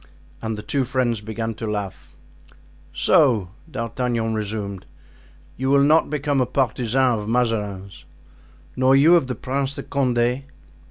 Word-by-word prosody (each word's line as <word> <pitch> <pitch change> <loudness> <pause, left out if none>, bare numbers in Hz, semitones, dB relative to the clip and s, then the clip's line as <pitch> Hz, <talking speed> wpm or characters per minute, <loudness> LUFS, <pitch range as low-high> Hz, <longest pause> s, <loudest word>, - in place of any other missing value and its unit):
And 110 -1 -3
the 105 - -7
two 140 -2 0
friends 125 -3 0
began 110 +1 -4
to 110 0 -5
laugh. 100 -3 -5 0.8
"So," 110 - +3 0.2
D'Artagnan 115 -3 -2
resumed, 105 -3 -4 0.7
"you 130 +1 -1
will 140 0 +5
not 155 +2 +4
become 145 -2 0
a 125 - +1
partisan 125 -1 +1
of 105 +1 -5
Mazarin's?" 105 -6 -2 0.7
"Nor 130 +1 +4
you 155 +6 +6
of 165 -7 +2
the 125 - -3
Prince 135 +1 -2
de - - -6
Condé?" 125 -1 0
120 Hz, 140 wpm, -22 LUFS, 110-135 Hz, 0.8 s, you